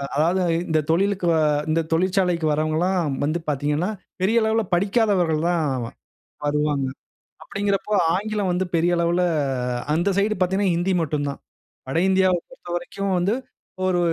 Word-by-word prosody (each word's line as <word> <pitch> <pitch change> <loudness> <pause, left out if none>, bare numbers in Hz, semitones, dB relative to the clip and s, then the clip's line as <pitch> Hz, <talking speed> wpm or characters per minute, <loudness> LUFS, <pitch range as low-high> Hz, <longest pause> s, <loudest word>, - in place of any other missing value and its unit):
அதாவது 170 +6 +2 0.3
இந்த 160 -1 +2
தொழிலுக்கு 190 +2 +1
வ - - +3 0.3
இந்த 160 +1 +2
தொழிற்சாலைக்கு 180 -1 +1
வரவங்கல்லாம் 155 +1 0
வந்து 155 +4 0
பார்த்தீங்கன்னா, 150 +5 0 0.3
பெரிய 225 +5 +3
அளவில 220 +1 +2
படிக்காதவர்கள் 190 -4 +2
தான் 170 -2 +1 0.8
வருவாங்க. 145 -1 0 0.6
அப்படீங்கிறப்போ, 200 +1 -2 0.2
ஆங்கிலம் 205 -1 -1
வந்து 180 +1 0
பெரிய 170 +1 +2
அளவில 170 +1 +1 0.7
அந்த 170 +5 +1
சைடு 210 +2 +2
பார்த்தீங்கifனா, 190 0 +2
ஹிந்தி 180 +3 0
மட்டும் 150 -2 -1
தான். 140 - -6 0.5
வட 135 - -2
இந்தியாவ 190 -1 +3
பொறுத்தவரைக்கும் 185 -3 -4
வந்து 180 +4 +1 0.5
ஒரு 185 -1 +2
180 Hz, 125 wpm, -23 LUFS, 160-195 Hz, 0.8 s, வ